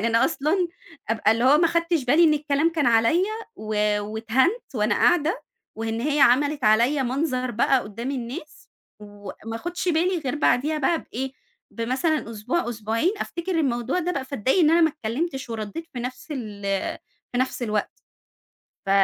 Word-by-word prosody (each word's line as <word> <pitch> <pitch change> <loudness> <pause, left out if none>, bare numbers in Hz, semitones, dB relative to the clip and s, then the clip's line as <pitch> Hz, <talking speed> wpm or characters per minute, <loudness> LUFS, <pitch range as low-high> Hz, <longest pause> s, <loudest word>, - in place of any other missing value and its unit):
يعني 225 - 0
أنا 230 0 +3
أصلًا 340 +4 0 0.4
أبقى 220 -1 +3
اللي 230 +2 0
هو 280 +3 +6
ما 335 - +4
خدتش 335 -4 0
بالي 300 +7 +5
إن 305 -1 +5
الكلام 295 +2 +1
كان 305 -6 +1
عليَّ 230 +10 +4 0.3
و 210 -1 0
واتهنت 230 - 0
وأنا 210 -1 +1
قاعدة 345 - +2 0.3
وإن 225 0 -3
هي 295 +3 0
عملت 285 +3 +4
عليَّ 235 +7 +4
منظر 255 -1 -1
بقى 245 +3 +2
قدّام 230 +6 -6
الناس، 260 +3 -7 0.3
وما 205 +2 -8
آخُدش 350 +7 -4
بالي 350 +2 +2
غير 275 -3 -3
بعديها 300 +2 +2
بقى 320 +4 +1
بإيه، 265 +2 -5 0.4
بمثلًا 255 +3 -1
أسبوع 240 +8 -2
أسبوعين 225 - 0
أفتكر 340 0 -3
الموضوع 250 +2 0
ده 360 +1 -1
بقى 275 -5 -3
فاتضايق 265 - 0
إن 315 -4 +5
أنا 335 +1 +5
ما 320 - +5
اتكلمتش 270 +1 -4
ورديت 225 +9 -5
في 250 - -6
نفس 255 +5 -6
ال 215 -7 -6 0.7
في 245 - -1
نفس 255 -1 -1
الوقت 215 -2 -2 0.9
ف - - -5
260 Hz, 165 wpm, -24 LUFS, 230-315 Hz, 0.9 s, هو